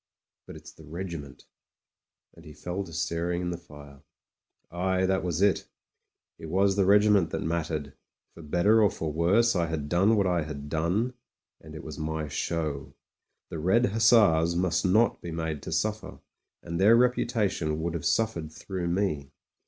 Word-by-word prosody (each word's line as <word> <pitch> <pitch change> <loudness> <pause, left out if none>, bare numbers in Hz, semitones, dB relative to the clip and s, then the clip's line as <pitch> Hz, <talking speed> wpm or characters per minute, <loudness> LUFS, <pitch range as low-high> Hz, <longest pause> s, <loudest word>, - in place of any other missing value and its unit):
But - - -10
it's - - -12
the 80 - -17
regiment" 80 -3 -7 0.9
And 85 - -16
he 75 -2 -12
fell 90 +6 -4
to 85 - -12
staring 85 +3 -2
at 90 - -2
the 85 - -4
fire. 70 -4 -14 0.7
Aye, 95 +2 0
that 95 0 0
was 90 +1 -1
it 100 -2 +2 0.7
It 80 - -8
was 95 +4 +2
the 100 -2 +2
regiment 105 -3 +4
that - - -3
mattered. 80 -3 -3 0.4
For 85 - -12
better 90 +8 +3
or 105 - +5
for 80 -4 -4
worse 100 +9 +3
I 85 -2 +1
had 75 -3 -4
done 95 +7 +3
what 100 -2 +2
I 90 -2 +1
had 75 -2 -7
done, 90 - 0 0.5
and 75 0 -11
it 80 - -8
was 75 -1 -8
my 80 0 -3
show. 75 -2 -3 0.5
The 80 - -6
Red 95 +10 +3
Hussars 105 -7 +4
must 90 0 0
not 110 +6 +2
be 85 - -7
made 80 -3 -4
to - - -7
suffer; - - -2 0.5
and 85 0 -4
their 110 +4 +7
reputation 110 -10 +1
would 85 0 -2
have 85 - -4
suf 110 0 +1
fered 80 -2 -7
through 90 +1 -5
me. 85 -6 -1
85 Hz, 175 wpm, -27 LUFS, 80-95 Hz, 0.9 s, their